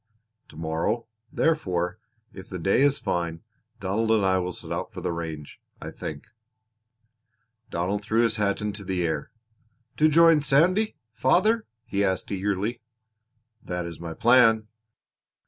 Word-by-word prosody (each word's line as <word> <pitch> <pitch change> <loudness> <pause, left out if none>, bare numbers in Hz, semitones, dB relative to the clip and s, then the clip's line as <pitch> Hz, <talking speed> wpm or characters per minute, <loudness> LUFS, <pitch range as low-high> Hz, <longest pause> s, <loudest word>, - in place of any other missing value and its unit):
To - - -14
morrow, 85 +9 -1 0.3
therefore, 90 - 0 0.3
if 95 -1 -11
the 95 - -5
day 95 +8 +2
is 140 0 +4
fine, 85 -1 -2 0.4
Donald 100 +4 -1
and 110 -3 +3
I 95 0 +3
will 90 0 -2
set - - -10
out - - -3
for - - -7
the - - -2
range, 80 -3 -6 0.2
I - - -7
think." - - -7 1.4
Donald 95 +4 -1
threw 110 +2 +2
his 115 -1 +1
hat 100 -1 0
into 105 -1 -4
the 90 -2 -1
air. 80 -3 -2 0.7
"To 155 +1 +5
join 165 0 +6
Sandy, 180 +10 +3 0.2
father?" 215 - +2 0.2
he 100 0 0
asked 95 -2 -1
eagerly. 100 +4 -1 0.8
"That 90 -1 -4
is 85 -2 -8
my 85 -1 -6
plan." 115 -2 +5
100 Hz, 145 wpm, -26 LUFS, 90-120 Hz, 1.4 s, join